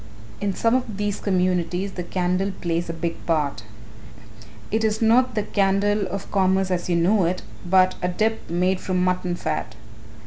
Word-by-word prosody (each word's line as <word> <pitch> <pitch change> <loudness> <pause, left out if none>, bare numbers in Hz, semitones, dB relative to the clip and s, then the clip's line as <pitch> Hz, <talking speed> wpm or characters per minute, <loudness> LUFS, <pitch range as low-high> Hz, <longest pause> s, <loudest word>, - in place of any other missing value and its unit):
"In 200 -2 -1
some 230 0 +2
of 245 -5 -1
these 205 -1 -2
communities 180 0 0
the 180 - -5
candle 180 +2 -1
plays 170 -1 -1
a - - 0
big 165 0 -4
part. 150 -6 0 1.1
It 220 +1 +1
is 220 0 +1
not 235 +2 +3
the 210 - +1
candle 200 +1 +1
of 195 0 -6
commerce 190 -1 +2
as 180 0 -1
you 175 - +2
know 180 +3 +3
it, 180 +2 -1 0.2
but 185 +1 +4
a 180 - +1
dip 220 +5 -1
made 180 +2 +1
from 185 -1 0
mutton 180 -1 0
fat. 115 -9 -3
185 Hz, 170 wpm, -23 LUFS, 175-205 Hz, 1.1 s, but